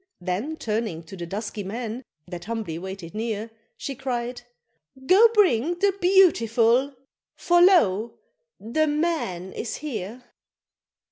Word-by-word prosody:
Then 195 - -3
turning 215 - -3
to 165 +4 -11
the 175 -2 -6
dusky 205 +2 -5
men, 225 +4 -5 0.3
that 175 -1 -8
humbly 215 -7 -4
waited 190 -2 -8
near, 220 0 -3 0.3
She 275 - -5
cried, 245 -2 -4 0.6
"Go 395 - +7
bring 345 - +3
the 400 +2 +2
BEAUTIFUL 270 - +4 0.4
for 350 0 +3
lo! 235 - +4 0.4
the 310 +9 0
MAN 295 - -2
is 230 - -4
here!" 245 -5 -6
230 Hz, 120 wpm, -24 LUFS, 195-305 Hz, 0.6 s, Go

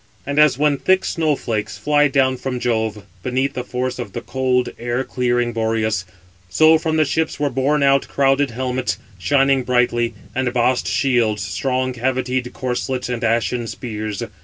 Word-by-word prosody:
And 140 +2 -1
as 150 -5 +5
when 145 -1 +2
thick 190 0 +2
snow 155 -3 +1
flakes 110 -5 -3
fly 150 0 +3
down 135 -2 +2
from 125 -1 -4
Jove, 110 -3 -1 0.2
beneath 130 +5 -1
the 125 - -4
force 125 0 -3
of 120 - -6
the - - -4
cold, 130 -1 0
air 120 +2 -1
clearing 120 -2 0
Boreas; 110 -3 0 0.4
so 155 +10 +5
from 160 0 -1
the 155 - +4
ships 160 +2 -1
were 145 -1 0
borne 140 +3 +1
out 140 0 +3
crowded 135 0 +2
helmets, 125 -4 -2 0.2
shining 135 +5 +3
brightly, 120 -2 +1 0.2
and 130 -1 0
bossed 125 +1 +1
shields, 115 -7 +1
strong 130 +7 -1
cavitied 125 0 -1
corslets, 125 0 -3
and 120 -1 -3
ashen 115 +1 0
spears. 110 -4 -5
125 Hz, 160 wpm, -20 LUFS, 120-135 Hz, 0.4 s, as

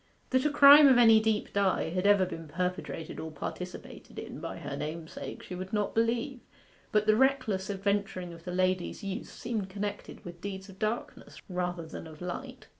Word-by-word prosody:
That 260 +1 +2
a - - +4
crime 290 0 +9
of 260 -2 +6
any 225 -2 +7
deep 220 -1 -1
dye 195 -4 +1
had 185 +3 0
ever 200 -2 +5
been 165 -3 -7
perpetrated 180 0 -4
or 160 - -5
participated 180 +4 -8
in - - -7
by - - -6
her - - -5
namesake, 160 +1 -6
she - - -8
would 185 +2 -6
not 210 -1 0
believe; 235 +3 0 0.5
but 210 0 +3
the 215 0 +5
reckless 235 -7 +1
adventuring 195 -3 -2
of 165 0 -13
the 180 - -5
lady's 185 +2 0
youth 195 -1 -4
seemed 220 -5 -4
connected 205 +1 -6
with 170 -1 -9
deeds 195 0 -6
of 190 - -14
darkness 215 +2 -4
rather 180 -2 -3
than 160 - -8
of 155 -1 -12
light. 250 +9 -6
195 Hz, 185 wpm, -30 LUFS, 180-220 Hz, 0.5 s, crime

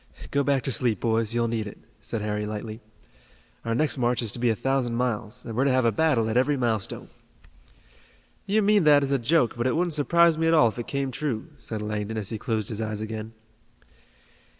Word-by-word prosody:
"Go 140 - +2
back 140 -2 +1
to 135 - 0
sleep, 120 -3 +1
boys, 115 -1 0
you'll 120 0 +1
need 110 -2 -2
it," 105 - -9 0.2
said 110 0 -4
Harry 105 0 -2
lightly. 110 +1 -6 0.8
"Our 115 0 -1
next 150 +1 +1
march 120 0 +1
is 110 - -1
to 120 - -3
be 120 0 +2
a 110 - +2
thousand 130 0 -1
miles, 120 -1 -2
and 115 - -6
we're 130 +4 +2
to 140 - +3
have 130 -1 +2
a 115 - +4
battle 125 -2 +2
at 110 - -2
every 140 +3 +2
milestone." 115 -5 -2 1.4
"You 210 +2 +2
mean 205 -1 +4
that 145 -1 +6
as 140 - -1
a 140 - +2
joke, 125 0 +2
but 120 +1 -1
it 130 - +1
wouldn't 175 0 0
surprise 165 +2 +3
me 165 - +2
at 165 - +4
all 150 -7 +6
if 110 - -8
it 120 - -5
came 140 -1 -2
true," 125 -4 -3
said 110 -2 -5
Langdon, 105 +1 -3
as 105 -3 -3
he 110 - -4
closed 110 -3 -2
his 110 0 -4
eyes 110 -1 -3
again. 110 0 -6
120 Hz, 220 wpm, -25 LUFS, 110-140 Hz, 1.4 s, that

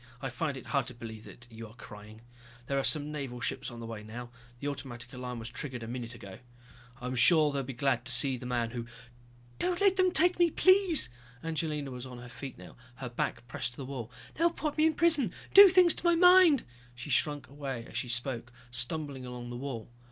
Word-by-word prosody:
I 135 - -4
find 140 +2 -3
it 130 - -9
very - - -11
hard 140 -5 +1
to 125 - -8
believe 110 -2 -9
that 120 - -12
you 115 0 -9
are 110 - -16
crying. 105 -1 -12 0.4
There 140 +2 0
are - - -1
some 150 0 +1
Naval 135 -5 -5
ships - - -3
on 120 - -10
the 115 - -7
way 115 -2 -7
now, 120 +3 -9 0.3
the 145 - -4
automatic 125 -4 -6
alarm 125 -1 -6
was 115 0 -6
triggered 125 -1 -6
about 115 - -6
a - - -4
minute 120 -1 -6
ago. 100 -4 -11 0.6
I'm 125 +1 -4
sure 150 +5 +5
they'll 140 - -1
be 135 0 -6
glad 125 -1 0
to 125 - +2
see 130 +2 +5
the 125 0 -7
man 120 -2 -1
who...." 120 -1 -5 0.7
"Don't 360 -1 0
let 395 -1 +3
them 370 -1 +4
take 355 +1 +3
me, 345 -1 +5
please!" 370 - +5 0.3
Angelina 155 -3 -3
was 125 +1 -7
on 125 -1 -9
her 120 0 -10
feet 135 +1 -8
now, - - -13 0.2
her 125 -1 -6
back 120 0 -3
pressed 120 +1 -4
to - - -13
the 135 - -6
wall. 130 -4 -6 0.2
"They'll 335 +2 +3
put 310 -3 -4
me 310 +1 +4
in 315 - 0
prison, 300 - +2 0.2
do 400 0 +11
things 360 -2 +6
to - - -7
my 345 -1 +4
mind!" 360 -4 +6 0.3
She 120 +4 -7
shrunk 145 +1 +1
away 135 -3 -6
as - - -13
she 125 - -3
spoke, 120 0 -3 0.2
stumbling 130 +1 -3
along 120 -1 -7
the - - -6
wall. 120 -3 -5
130 Hz, 230 wpm, -30 LUFS, 120-160 Hz, 0.7 s, do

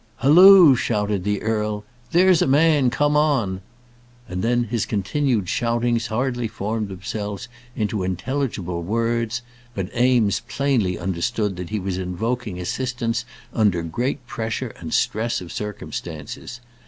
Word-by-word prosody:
"Halloo!" 175 +2 +8
shouted 105 -5 -1
the 105 +1 -1
earl. 105 -1 -1 0.3
"There's 180 0 +5
a - - +3
man. 145 -1 +4
Come 145 +4 +1
on." 125 -11 +1 0.7
And 90 -1 -4
then 120 +1 +2
his 115 -1 -2
continued 110 +1 0
shoutings 120 +2 0
hardly 120 +1 -1
formed 110 0 -3
themselves 100 +3 -5 0.3
into 105 -1 -1
intelligible 95 -2 -2
words; 115 +4 -1 0.3
but 95 -1 -4
Eames 120 -4 +3
plainly 120 -9 0
understood 95 +3 -1
that 90 -1 -6
he 105 0 -2
was 95 -1 -3
invoking 105 +2 -3
assistance 115 +3 -2 0.3
under 100 -7 +2
great 125 - -3
pressure 110 -2 -4
and - - -7
stress 115 +2 0
of 90 -2 -9
circumstances. 105 +1 -6
115 Hz, 130 wpm, -22 LUFS, 100-125 Hz, 0.7 s, Halloo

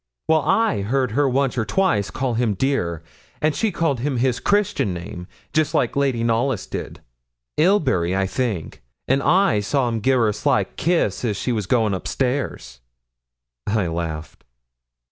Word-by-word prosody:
'Well, 160 -1 +4
I 185 - +2
heard 125 +4 0
her 140 +4 +2
once 130 -1 0
or - - +1
twice 105 - +1
call 130 -2 -2
him 115 -3 0
"dear," 90 - -1 0.4
and 155 0 +1
she 220 -2 0
called 165 -7 0
him 135 +1 -1
his 125 0 +1
Christian 205 - +1
name, 90 0 -7 0.3
just 155 -1 +1
like 120 - +1
Lady 135 -4 +1
Knollys 115 0 0
did - - -6 0.6
Ilbury, 135 - +2
I 95 0 +1
think 95 -3 -3 0.3
and 135 +1 +2
I 175 - +3
saw 125 +5 0
him 115 -1 -2
gi' 130 - +1
her 125 -4 +4
a - - -1
sly 105 0 +1
kiss 160 - -1
as 105 -5 -1
she 125 - -2
was 105 -5 -2
going 110 -3 +2
up 95 - -4
stairs.' 125 - -2 0.9
I 105 -2 +1
laughed. 80 -2 -5
120 Hz, 165 wpm, -22 LUFS, 100-140 Hz, 0.9 s, Well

